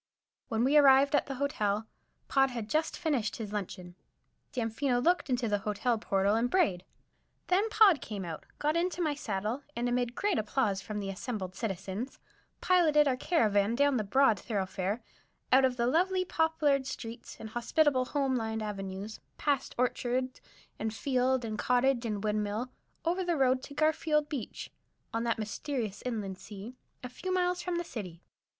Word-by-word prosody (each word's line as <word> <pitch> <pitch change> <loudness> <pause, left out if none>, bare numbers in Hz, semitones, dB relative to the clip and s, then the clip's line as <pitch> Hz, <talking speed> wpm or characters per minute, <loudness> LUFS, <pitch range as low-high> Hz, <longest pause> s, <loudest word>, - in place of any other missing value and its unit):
When 225 0 0
we 280 +4 +4
arrived 275 0 +6
at 290 - +2
the 270 - -4
Hotel, 220 -6 0 0.4
Pod 270 -1 +3
had 235 -4 -5
just 315 +1 0
finished 280 -10 0
his 215 -2 -6
luncheon. 180 -3 -5 0.6
Damfino 245 +1 0
looked 345 +4 +2
into 250 -2 +1
the 205 -1 +1
hotel 215 +3 0
portal 195 0 +1
and 230 +2 +2
brayed. 265 - +2 0.7
Then 395 +5 +3
Pod 415 - +6
came 200 -4 -5
out, 160 -2 -7
got 300 +2 0
into 355 +1 0
my 310 -4 +1
saddle, 220 -2 -3
and 240 +1 -1
amid 245 0 0
great 410 - +1
applause 210 -3 0
from 210 +1 -5
the 195 -1 -3
assembled 195 -2 -5
citizens, 200 +3 -4 0.4
piloted 310 -5 +4
our 260 - +2
caravan 220 - +2
down 285 0 +3
the 215 - 0
broad 225 +2 +3
thoroughfare, 195 0 -2 0.5
out 265 +1 +7
of 250 -1 0
the 235 - +1
lovely 370 +7 +2
poplared 305 -5 +1
streets 230 -2 -7
and 220 - -7
hospitable, 255 +3 +2
home 270 -1 0
lined 220 -2 -2
avenues, 200 0 -5 0.2
past 280 -3 0
orchard 250 +1 0 0.4
and 220 0 -2
field 255 -1 +1
and 215 -1 -4
cottage 250 -1 +2
and 210 -2 -3
windmill, 215 +3 -1 0.3
over 355 +3 +1
the 345 -2 0
road 260 -1 +3
to 285 - -10
Garfield 310 -1 +2
Beach, 270 -8 -5 0.4
on 230 +1 -1
"that 230 - +1
mysterious 220 0 -3
inland 210 -6 -3
sea," 210 +4 -9 0.3
a - - -3
few 370 +9 -5
miles 360 -1 +1
from 360 0 -2
the 345 - -1
city. 185 - -7
245 Hz, 165 wpm, -30 LUFS, 215-290 Hz, 0.7 s, out